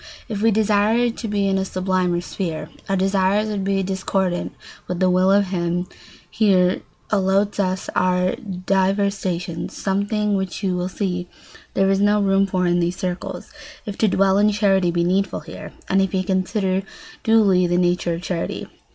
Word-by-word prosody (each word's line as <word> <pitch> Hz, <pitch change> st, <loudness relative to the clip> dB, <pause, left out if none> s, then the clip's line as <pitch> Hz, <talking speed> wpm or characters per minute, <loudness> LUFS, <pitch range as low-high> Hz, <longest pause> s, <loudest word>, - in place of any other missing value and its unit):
If 205 Hz, -2 st, -4 dB
we 225 Hz, -, +4 dB
desired 220 Hz, +2 st, +2 dB
to 230 Hz, -, -4 dB
be 205 Hz, -1 st, 0 dB
in 195 Hz, 0 st, +1 dB
a -, -, 0 dB
sublimer 185 Hz, -2 st, 0 dB
sphere, 165 Hz, -4 st, -5 dB, 0.2 s
our 195 Hz, -, +2 dB
desires 195 Hz, +2 st, +1 dB
would 205 Hz, -2 st, -2 dB
be 195 Hz, 0 st, 0 dB
discordant 190 Hz, -1 st, -1 dB, 0.4 s
with 180 Hz, -1 st, -3 dB
the 185 Hz, -1 st, +3 dB
will 185 Hz, +1 st, +3 dB
of 200 Hz, -1 st, +3 dB
him 175 Hz, -1 st, -1 dB
who 180 Hz, -, -17 dB, 0.4 s
here 190 Hz, -4 st, +3 dB, 0.3 s
allots 200 Hz, 0 st, +1 dB
us 185 Hz, -1 st, -1 dB
our 180 Hz, 0 st, +2 dB
divers 195 Hz, -2 st, 0 dB
stations—something 195 Hz, +4 st, -2 dB
which 190 Hz, +1 st, -3 dB
you 185 Hz, -2 st, 0 dB
will 180 Hz, +1 st, -2 dB
see 180 Hz, -2 st, -3 dB, 0.5 s
there 195 Hz, 0 st, +3 dB
is 195 Hz, -, +2 dB
no 205 Hz, +1 st, +3 dB
room 195 Hz, 0 st, +2 dB
for 185 Hz, -1 st, 0 dB
in 175 Hz, 0 st, +2 dB
these 175 Hz, +1 st, 0 dB
circles, 180 Hz, -2 st, -5 dB, 0.3 s
if 205 Hz, -, -5 dB
to 220 Hz, -, +4 dB
dwell 195 Hz, 0 st, +3 dB
in 210 Hz, +1 st, +4 dB
charity 195 Hz, -3 st, +2 dB
be 170 Hz, 0 st, +1 dB
needful 190 Hz, +1 st, 0 dB
here, 160 Hz, +2 st, -9 dB, 0.2 s
and 195 Hz, 0 st, +3 dB
if 195 Hz, 0 st, -1 dB
you 185 Hz, -, +1 dB
consider 190 Hz, 0 st, 0 dB, 0.4 s
duly 200 Hz, -5 st, +4 dB
the 175 Hz, 0 st, +1 dB
nature 175 Hz, -1 st, +1 dB
of 170 Hz, -, -8 dB
charity. 175 Hz, -3 st, -3 dB
190 Hz, 175 wpm, -21 LUFS, 180-200 Hz, 0.5 s, we